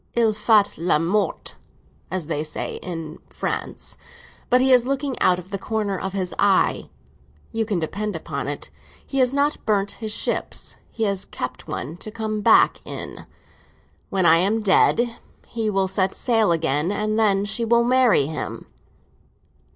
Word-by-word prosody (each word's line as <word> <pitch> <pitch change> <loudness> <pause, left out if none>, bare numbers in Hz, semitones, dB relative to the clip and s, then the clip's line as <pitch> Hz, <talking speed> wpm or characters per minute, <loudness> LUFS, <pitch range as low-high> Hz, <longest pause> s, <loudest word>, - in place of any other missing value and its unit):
Il 230 -2 +3
fait 210 -2 +3
le 170 -2 +3
mort, 180 +3 -1 0.6
as 180 -2 -3
they 150 -1 -2
say 155 - -4
in 165 -3 -6
France; - - -4 0.5
but 250 - +5
he 260 0 +4
is 250 -1 +4
looking 275 -1 -1
out 180 - +4
of 180 +2 -10
the 195 - -3
corner 210 -1 -2
of 190 +1 -4
his 185 -2 -2
eye. 200 -2 +2 0.6
You 225 -1 -1
can 205 -4 0
depend 200 +5 -3
upon 140 -4 -4
it 145 - -5 0.3
he 275 - -2
has 255 -1 +4
not 285 +2 0
burned 200 -2 +1
his 220 -2 -5
ships; - - -1
he 225 - -3
has 200 -2 0
kept 125 - -6
one 155 +6 -5
to 215 - -8
come 215 -1 -3
back - - +5
in. - - -7 0.8
When 190 -2 +1
I 165 -1 +7
am 210 +6 +1
dead, 230 +4 +3 0.3
he 225 -2 -2
will 195 -2 +1
set 190 0 0
sail 225 -6 +2
again, 160 0 +1
and 215 +1 -1
then 200 -2 +3
she 225 +3 -1
will 235 +1 +3
marry 245 - +4
him." 155 +2 -5
205 Hz, 165 wpm, -23 LUFS, 180-225 Hz, 0.8 s, I